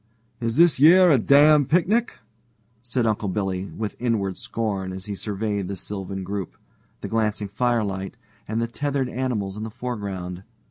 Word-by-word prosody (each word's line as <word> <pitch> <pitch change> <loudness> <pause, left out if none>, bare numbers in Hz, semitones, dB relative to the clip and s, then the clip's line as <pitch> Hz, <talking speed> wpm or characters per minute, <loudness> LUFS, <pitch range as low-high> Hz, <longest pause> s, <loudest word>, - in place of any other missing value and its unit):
"Is 115 -1 -2
this 170 -3 +5
yer 175 +4 +7
a 135 - +5
damned 145 +3 +5
picnic?" 205 +8 +2 0.6
said 125 0 -1
Uncle 105 -2 0
Billy 95 -1 -2
with 105 +1 -5
inward 105 -6 0
scorn 100 -5 -3
as 95 0 -7
he 105 - -4
surveyed 100 -1 -3
the 100 - -4
sylvan 95 0 -6
group, 100 -1 -5 0.4
the - - -4
glancing 110 -2 -1
firelight, 100 -3 -1 0.3
and 110 +2 -2
the 115 - 0
tethered 140 +1 -2
animals 115 -6 -2
in - - -5
the 110 - -4
foreground. 100 -7 -5
110 Hz, 155 wpm, -24 LUFS, 100-125 Hz, 0.6 s, yer